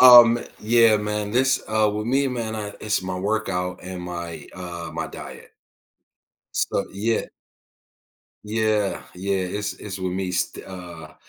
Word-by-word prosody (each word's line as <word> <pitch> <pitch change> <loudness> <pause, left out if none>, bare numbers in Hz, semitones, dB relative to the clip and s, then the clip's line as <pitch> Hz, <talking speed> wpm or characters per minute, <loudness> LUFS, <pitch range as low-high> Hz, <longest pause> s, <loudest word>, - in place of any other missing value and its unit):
Um, 120 -2 +10 0.2
yeah, 115 0 +6
man. 105 0 -2
This, 130 +3 +3
uh, 110 -1 +3
with 105 +1 -3
me, 135 +3 +3
man, 115 -3 -3
I 105 -1 -4
it's 105 -3 0
my 95 0 -3
workout 90 -2 -1
and 90 0 -6
my, 85 -3 -5
uh, 85 -2 -6
my - - -2
diet. - - -10 1.0
So - - +1
yeah. 110 +4 0 1.2
Yeah. 110 -2 +1
Yeah. 95 +2 -1
It's 100 +2 -2
it's 100 -2 -6
with 95 -1 -2
me, 95 0 -1
st 90 - -1
uh 85 -4 -9
105 Hz, 145 wpm, -24 LUFS, 90-110 Hz, 1.2 s, Um